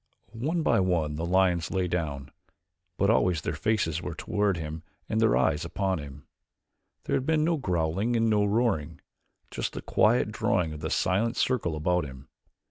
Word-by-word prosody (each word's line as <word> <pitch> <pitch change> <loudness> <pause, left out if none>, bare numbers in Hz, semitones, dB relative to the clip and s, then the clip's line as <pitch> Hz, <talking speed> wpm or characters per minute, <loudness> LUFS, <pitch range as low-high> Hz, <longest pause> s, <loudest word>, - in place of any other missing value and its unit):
One 160 +7 0
by 115 - +3
one 85 -5 0
the 80 - -2
lions 90 -2 +2
lay 95 -2 0
down, 75 -6 -3 0.7
but 100 +2 +3
always 90 -7 +2
their - - -2
faces 95 -7 0
were 85 - -5
toward 100 -3 0
him 80 0 -5 0.3
and 110 - 0
their 110 - +4
eyes 75 +3 +1
upon 95 +2 -1
him. 70 -1 -10 0.8
There - - -1
had 130 - -1
been 160 -1 +2
no 165 +1 +1
growling 95 - 0
and 115 0 +2
no 105 -2 +3
roaring 100 -8 0 0.5
just - - -3
the - - -5
quiet - - +2
drawing 80 -3 0
of 75 - -7
the 80 0 -3
silent 110 +10 +1
circle 110 -11 0
about 90 +3 +1
him. 65 -1 -11
90 Hz, 175 wpm, -27 LUFS, 80-110 Hz, 0.8 s, their